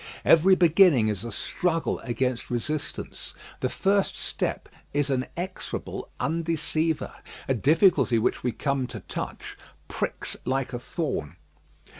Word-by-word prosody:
Every 185 +4 +7
beginning 165 - +5
is 105 -1 -2
a 115 - -5
struggle 165 - -1
against 125 0 -2
resistance. 145 +5 -4 0.2
The 130 - 0
first 195 +5 +1
step - - -3 0.3
is 145 -1 +2
an 130 -1 0
exorable 185 +2 -5
undeceiver. 160 +1 0 0.3
A 135 - +3
difficulty 145 - +4
which 110 - +1
we 125 - 0
come 140 0 -1
to - - -7
touch - - -6 0.3
pricks - - -3
like 135 0 -1
a 120 - -2
thorn. 130 - -3
145 Hz, 125 wpm, -26 LUFS, 125-165 Hz, 0.3 s, Every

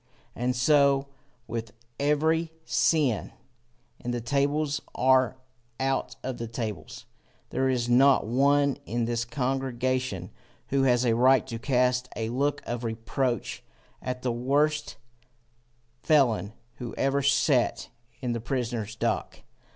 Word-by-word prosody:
And 125 +1 -1
so 140 +1 +3 0.4
with 115 -2 -5 0.3
every 160 +3 +1
sin 145 -12 +1 0.7
in 120 - -6
the 120 0 -1
tables 140 +3 0
or 130 0 +3 0.4
out 135 0 -1
of 130 -1 -4
the 115 - -4
tables. 110 -3 -6 0.5
There 130 +1 +1
is 125 -2 0
not 130 +3 +5
one 140 +3 +3
in 120 0 -1
this 120 0 -1
congregation 130 -3 -2 0.4
who 140 0 +2
has 125 -1 +3
a 115 - +3
right 130 +3 +4
to 115 -3 -6
cast 125 -1 +1
a 110 -1 -2
look 140 +4 -1
of 120 0 -4
reproach 115 +2 -2 0.4
at 125 0 -4
the 125 - +1
worst 145 +5 0 1.1
felon 115 - +2 0.2
who 120 -1 -6
ever 135 +1 +1
sat 140 -2 +2 0.3
in 125 - 0
the 115 - -3
prisoners' 120 -4 -3
dock. - - -2
130 Hz, 125 wpm, -27 LUFS, 120-140 Hz, 1.1 s, not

